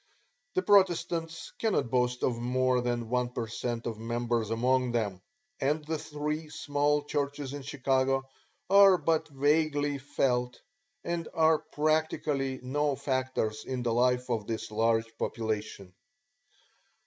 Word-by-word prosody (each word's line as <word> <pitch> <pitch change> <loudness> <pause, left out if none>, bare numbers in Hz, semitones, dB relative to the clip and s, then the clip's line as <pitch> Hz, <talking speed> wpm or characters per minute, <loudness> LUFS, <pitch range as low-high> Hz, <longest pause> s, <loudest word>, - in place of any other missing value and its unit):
The 185 - +1
Protestants 175 -4 +2
cannot 210 - 0
boast 125 -1 +1
of 120 -2 0
more 125 +1 +1
than 120 -1 -2
one 125 +1 0
per 120 -1 -3
cent. 115 +1 -4
of 115 -2 -4
members 115 -1 -1
among 125 +2 +1
them, 100 -6 -1 0.4
and 150 +3 0
the 160 0 -2
three 150 +1 -4
small 145 0 0
churches 145 -1 -3
in 145 - -5
Chicago 135 -1 0 0.4
are 195 -1 +7
but 165 -2 0
vaguely 145 0 +1
felt 125 -2 -1 0.4
and 170 -1 -3
are 160 -1 +4
practically 150 -3 -1
no 145 +2 0
factors 130 -5 -2
in 130 -2 -4
the 120 -2 0
life 125 +1 +2
of 110 -3 -1
this 110 -1 -4
large 115 +1 +1
population. 110 -4 -3
130 Hz, 130 wpm, -29 LUFS, 120-150 Hz, 0.4 s, are